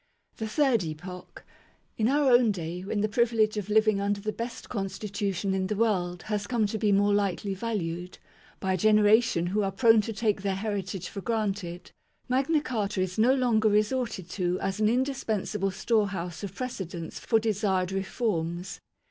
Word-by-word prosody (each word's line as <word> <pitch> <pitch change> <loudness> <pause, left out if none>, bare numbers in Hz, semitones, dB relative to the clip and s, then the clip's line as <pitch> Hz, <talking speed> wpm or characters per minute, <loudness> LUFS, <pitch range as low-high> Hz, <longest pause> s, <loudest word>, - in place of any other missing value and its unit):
THE 220 - -3
THIRD 250 - +2
EPOCH. 180 +3 -8 0.5
In 220 - +1
our 280 0 +3
own 240 -2 +5
day, 175 -1 -5
when 205 +2 -2
the 215 - +2
privilege 220 -1 +2
of 210 -1 -4
living 215 -1 +3
under 200 0 0
the 215 +1 -3
best 235 +1 -6
constitution 200 -2 -2
in 190 -1 0
the 210 - -2
world 185 -5 0
has 210 -1 -2
come 235 -2 +1
to 215 +1 -2
be 210 -1 +2
more 205 +1 +3
lightly 200 0 0
valued, 180 -4 -4 0.4
by 190 0 0
a - - +1
generation 215 -2 +4
who 200 +4 0
are 195 -1 0
prone 225 -1 +5
to 225 - -5
take 215 -2 0
their 195 -1 -1
heritage 195 -3 -3
for 200 - -7
granted, 200 -6 -3 0.4
Magna 275 +5 +2
Carta 210 -8 -2
is 185 +2 -2
no 250 +4 +5
longer 230 -4 +3
resorted 210 -2 0
to 180 -1 -1
as 195 +2 -2
an 215 0 +3
indispensable 220 -6 -1
storehouse 190 -4 -1
of 200 -1 -6
pre 255 - -2
cedents 170 -7 -6
for 225 - +2
desired 200 -4 0
reforms. 190 -3 -2
205 Hz, 175 wpm, -28 LUFS, 190-225 Hz, 0.5 s, own